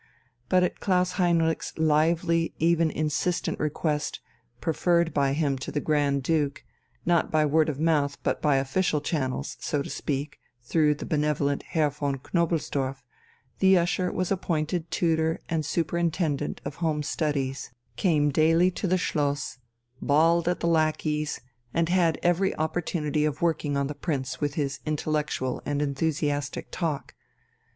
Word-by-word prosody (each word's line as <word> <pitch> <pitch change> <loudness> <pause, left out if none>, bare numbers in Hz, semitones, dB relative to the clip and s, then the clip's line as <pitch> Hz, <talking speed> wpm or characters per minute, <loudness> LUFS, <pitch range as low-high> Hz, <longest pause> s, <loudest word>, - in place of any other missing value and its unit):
But 185 -1 +4
at 180 - -1
Klaus 180 -2 +2
Heinrich's 165 -2 +1
lively, 165 +2 +2
even 165 0 +3
insistent 155 +4 -1
request, 150 0 -1 0.4
preferred 170 0 +1
by 140 -1 +2
him 140 -3 0
to 130 - -5
the 150 - -1
Grand 145 -3 +1
Duke, 145 -2 0 0.4
not 170 -1 +2
by 155 -1 +3
word 155 +1 +3
of 145 -2 -4
mouth 150 -3 +1
but - - 0
by 150 -2 +3
official 150 +4 +1
channels, 135 - -2
so 145 -1 -1
to - - -7
speak, 145 0 -3 0.2
through 150 +3 +2
the - - -7
benevolent 150 -2 0
Herr 155 -4 0
von 140 -1 -2
Knobelsdorff, 140 -4 -1 0.6
the 190 -1 +6
usher 175 +1 +1
was 185 0 -2
appointed 170 -2 -1
tutor 160 -1 +1
and 160 -2 0
superintendent 165 -1 -1
of 140 0 -5
home 155 -3 0
studies, 140 -3 -2 0.3
came 150 -6 +2
daily 165 +5 +4
to 190 - -3
the 185 +1 +3
Schloss, 145 -6 -1 0.4
bawled 165 +4 +3
at 180 - 0
the - - +1
lackeys, 155 -2 0 0.3
and 165 0 +2
had 175 -3 +3
every 175 +2 +2
opportunity 155 -2 -1
of 150 +2 -1
working 150 -4 +1
on 140 - +1
the 145 - -4
Prince 135 -4 -3
with 145 -1 -1
his 140 -3 -2
intellectual 150 -4 -1
and 145 0 -1
enthusiastic 145 -1 -1
talk. 160 -6 -3
155 Hz, 145 wpm, -26 LUFS, 145-170 Hz, 0.6 s, the